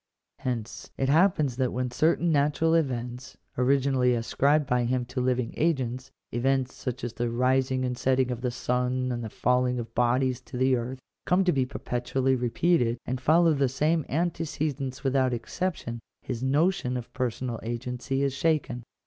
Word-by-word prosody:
Hence 115 -3 -4
it 135 - 0
happens 155 -5 +3
that 130 -2 +1
when 125 0 -2
certain 165 +5 +2
natural 150 +2 +2
events, 125 -5 -2 0.2
originally 130 -1 +2
ascribed 140 +6 +2
by 125 -2 +1
him 125 0 0
to 125 +1 -3
living 125 -2 0
agents 130 -5 -1
— - - -58
events 130 +1 0
such 130 0 -5
as 120 -1 -3
the 120 0 -2
rising 130 +2 +1
and 125 0 -2
setting 130 0 +1
of 120 -1 -4
the 125 - 0
sun 125 +1 -1
and 120 -1 -3
the 110 - -4
falling 125 +2 +1
of 115 -1 -6
bodies 125 +1 +1
to - - -8
the 130 +1 +3
earth 125 +2 -3 0.2
— - - -59
come 180 +2 +4
to 180 - +3
be 130 -4 +1
perpetually 130 0 -1
repeated, 125 0 +1
and 125 +1 -3
follow 165 +3 +4
the 140 -2 +1
same 155 +5 +1
antecedents 150 -5 -2
without 130 -2 +2
exception, 120 -1 -4 0.2
his 115 - -4
notion 140 -1 +1
of 120 - -8
personal 125 -2 -2
agency 125 +3 -3
is 140 -1 0
shaken. 135 -4 0
130 Hz, 170 wpm, -27 LUFS, 125-140 Hz, 0.2 s, come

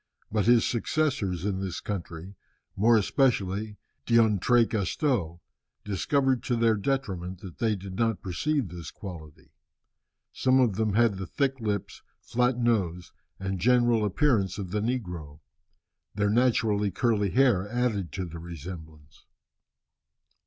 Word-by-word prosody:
But 105 0 0
his 120 -1 +5
successors 115 - -1
in 100 -2 -1
this 95 -2 -4
country, 90 -2 -6 0.4
more 115 +4 +4
especially 105 -3 0 0.3
D'Entrecasteaux, 115 - +2 0.5
discovered 130 +6 +1
to 125 - -1
their 115 -1 +3
detriment 95 -7 -3
that 90 -4 -10
they 110 -2 +1
did 95 -1 -8
not 115 -3 0
preserve 130 - -1
this 85 -3 -8
quality. 80 -6 -10 0.8
Some 130 0 +3
of 120 -5 +3
them 110 -1 0
had 115 -3 +3
the 95 - -5
thick 135 - -1
lips, 105 -3 -3 0.2
flat 125 +1 0
nose, 95 -8 0 0.3
and 95 -1 -3
general 120 +1 +3
appearance 105 -1 +1
of 95 -4 -5
the 105 +1 -1
negro. 90 - -4 0.8
Their 105 0 +1
naturally 110 -3 +2
curly 105 +1 +1
hair 110 -5 +3
added 110 - -1
to 95 -1 -3
the 85 -1 -8
resemblance. 80 -3 -10
105 Hz, 125 wpm, -27 LUFS, 90-120 Hz, 0.8 s, his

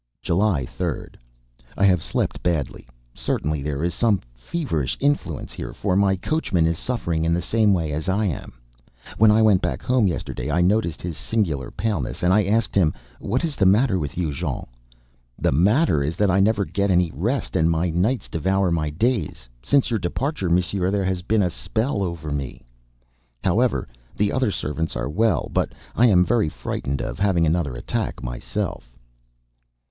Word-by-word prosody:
July 85 -6 +1
3d. - - -4 0.6
I 100 - +3
have 90 -4 +4
slept - - -2
badly; 80 -6 -2 0.3
certainly 75 0 -2
there 70 +1 -3
is 85 - 0
some 110 -5 +2
feverish 75 - -3
influence 140 - -1
here, - - -6
for 90 - -1
my 100 0 +3
coachman 95 - 0
is 80 0 0
suffering 85 -10 -1
in 85 0 +2
the - - 0
same 110 +2 +3
way 85 -5 0
as 75 +5 -3
I 105 +3 +1
am. 85 -10 -4 0.7
When 110 0 +7
I 110 +1 +5
went 100 -4 +5
back - - -2
home 125 -5 +3
yesterday, 85 -4 -3
I 80 +4 +1
noticed 90 -1 +1
his 85 -3 -5
singular 80 - -1
paleness, 100 - -3
and 90 +1 +4
I 105 0 +4
asked 110 +3 +1
him: 85 -6 +3 0.2
"What - - -1
is 155 -3 -3
the 95 - +3
matter 105 0 +3
with 70 -1 -5
you, 85 -4 0
Jean?" - - -3 0.7
"The - - +1
matter 100 - +3
is 75 +4 -1
that 100 0 +2
I 95 - +3
never 100 0 +3
get 100 +1 -1
any 90 -2 +3
rest, 115 - -2
and 80 +1 +3
my 85 +1 +1
nights 105 +10 0
devour 95 +3 0
my 80 -2 0
days. 95 - -1
Since 135 - +2
your 115 - +1
departure, 100 - -2
monsieur, 90 +2 +1
there 100 -1 0
has 95 -1 -1
been 105 +3 +2
a 90 - 0
spell 110 +5 -2
over 85 -5 -3
me." 70 -3 -4 0.8
However, - - +1 0.3
the 105 0 +2
other 130 -4 +1
servants 80 -3 -3
are - - -2
all - - -7
well, 105 - +1
but - - 0 0.2
I 125 - +5
am 90 -5 +5
very 115 -8 +2
frightened 70 -2 -4
of - - -5
having 95 -5 +3
another 80 -5 0
attack, - - -3
myself. - - -4
90 Hz, 180 wpm, -23 LUFS, 80-105 Hz, 0.8 s, When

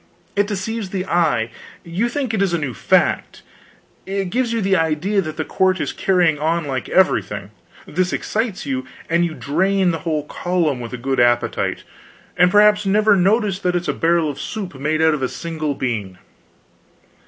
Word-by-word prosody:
It 205 0 +2
deceives 210 +1 -3
the 190 -1 -3
eye; 150 -10 +1 0.3
you 185 +8 -1
think 260 -2 -2
it 210 - 0
is 190 -3 +2
a - - +1
new 145 -6 -3
fact; - - +1 0.6
it 195 -2 -2
gives 245 0 0
you 230 - 0
the 195 -2 +2
idea 165 +5 +1
that 155 -3 -6
the 155 - -2
court 185 0 +1
is - - -2
carrying 175 -5 +2
on 165 +2 0
like 130 -3 -3
everything; 105 - +1 0.3
this 180 +3 -1
excites 220 -5 -2
you, 130 -2 -2 0.3
and 170 +1 +3
you 165 -2 -2
drain 180 +8 +1
the 165 - -3
whole 155 -2 -2
column, 165 -3 -1
with 120 -1 -7
a - - -3
good 135 +2 -1
appetite, 120 0 +1 0.5
and 180 0 +5
perhaps 210 +1 +5
never 210 +1 +4
notice 200 +1 +2
that 180 -2 0
it's 175 0 -1
a - - +1
barrel 170 -1 +2
of 145 - -5
soup 200 -5 -5
made 155 +4 -1
out 160 -1 +4
of 150 - -2
a 130 - 0
single 155 -3 -4
bean. 110 -9 -3
175 Hz, 185 wpm, -20 LUFS, 150-195 Hz, 0.6 s, and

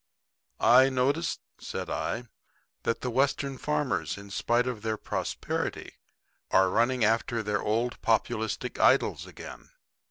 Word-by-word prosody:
"I 130 +2 +6
notice," 140 +6 0 0.2
said - - -5
I, 120 - -2 0.6
"that 115 - -1
the 125 - -2
Western 135 +1 0
farmers, 125 - -1
in 100 0 -11
spite 120 +5 +1
of 125 -4 -3
their 110 0 -2
prosperity, - - -3 0.6
are 95 -1 +4
running 120 +1 +2
after 115 +1 +1
their 105 -1 -1
old 115 +3 -1
populistic 110 -1 -1
idols - - +3
again." - - -10
120 Hz, 125 wpm, -28 LUFS, 110-130 Hz, 0.6 s, I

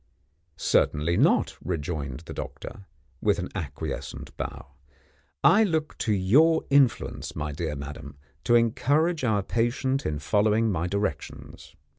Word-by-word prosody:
"Certainly 80 0 +1
not," - - +3
rejoined 75 -5 -4
the 85 - -9
doctor, 95 - -8 0.3
with - - +2
an - - -4
acquiescent - - -6
bow. 70 - -7 0.7
"I 215 +2 +6
look 160 -6 -1
to 110 - 0
your 135 - +4
influence, 140 -4 +2
my 75 0 -3
dear 75 +1 -3
madam, 70 0 -8 0.3
to 120 - +4
encourage 145 +8 +2
our 105 -5 +1
patient 130 +5 0
in 75 - -2
following 105 +7 +2
my 85 -1 -1
directions. 95 -7 -5
100 Hz, 125 wpm, -26 LUFS, -, 0.7 s, I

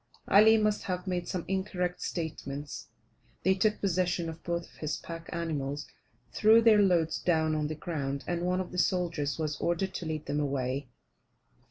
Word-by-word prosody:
Ali 220 +3 +7
must 215 -1 +1
have 180 -1 -3
made 180 -2 -2
some 180 -3 -3
incorrect 185 -2 -2
statements. 145 -4 -5 0.6
They 190 - +4
took 210 +3 +1
possession 180 -3 0
of 165 0 -8
both 170 0 -2
of - - -20
his 155 0 -2
pack 165 -1 -8
animals, 145 -4 -3 0.5
threw 220 +2 +6
their 225 -2 +6
loads 170 -5 +2
down 160 -2 +2
on 150 -1 0
the 155 - -4
ground, 140 -5 -3
and 175 -1 -2
one 180 +1 +1
of 185 - -7
the 180 - -2
soldiers 170 -6 0
was 155 -2 -2
ordered 180 +3 0
to 170 - -4
lead 155 -1 -3
them 145 +1 -1
away. 135 -1 -1
170 Hz, 175 wpm, -30 LUFS, 155-185 Hz, 0.6 s, Ali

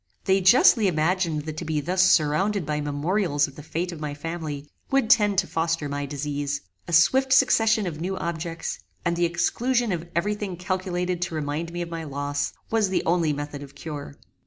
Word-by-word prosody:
They 190 0 +3
justly 215 +2 +6
imagined 165 -1 +1
that 155 0 -6
to - - -4
be 155 -1 -1
thus 180 +5 +1
surrounded 185 +3 +3
by 150 0 -1
memorials 145 +2 0
of 140 - -13
the - - -9
fate 170 +4 -3
of 170 - -8
my 150 -1 -4
family, 150 -2 -5 0.2
would 270 -4 +2
tend 210 -5 +4
to - - +3
foster 165 -2 -1
my 145 0 -3
disease. 145 0 -3 0.3
A - - -6
swift 260 +11 +4
succession 225 -5 +4
of 160 -3 -5
new 190 +2 -2
objects, 165 0 -4 0.3
and 170 0 +1
the 175 0 +2
exclusion 235 +8 +1
of 170 -1 -3
every 205 +5 +1
thing 205 -4 -5
calculated 180 -1 -2
to 175 -2 -2
remind 155 +2 -3
me 175 0 -3
of 170 - -8
my 165 -1 -4
loss, 145 0 -2 0.2
was 220 -3 +2
the 190 - 0
only 165 -2 +2
method 145 0 -5
of 140 0 -11
cure. 145 -3 -7
170 Hz, 195 wpm, -25 LUFS, 150-185 Hz, 0.3 s, justly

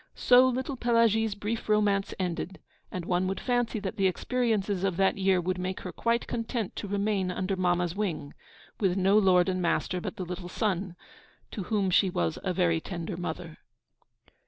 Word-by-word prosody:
So 250 +1 +6
little 260 +2 -2
Pelagie's 230 -3 +2
brief 215 +2 -4
romance 205 -2 +2
ended; 185 0 -3 0.3
and 180 -2 -4
one 180 +1 +1
would 195 - -2
fancy 245 -2 0
that 200 +3 -4
the 195 -1 +3
experiences 210 -2 0
of 190 -3 0
that 195 0 +2
year 190 -1 +3
would 185 +1 -2
make 185 +1 -3
her - - -6
quite 235 0 0
content 230 -3 -3
to - - -4
remain 200 -1 0
under 185 +1 -2
mamma's 175 -1 0
wing, 180 -8 -3 0.5
with 190 -3 +1
no 195 +2 +3
lord 185 -4 +5
and 185 -1 0
master 180 +1 0
but - - -5
the 185 - -5
little 175 0 -6
son, 190 -3 -1 0.6
to 195 - -5
whom 200 -3 0
she 190 +1 +4
was 85 - -1
a 185 - 0
very 175 -2 +2
tender 175 0 -5
mother. 170 -1 -6
190 Hz, 180 wpm, -28 LUFS, 180-215 Hz, 0.6 s, So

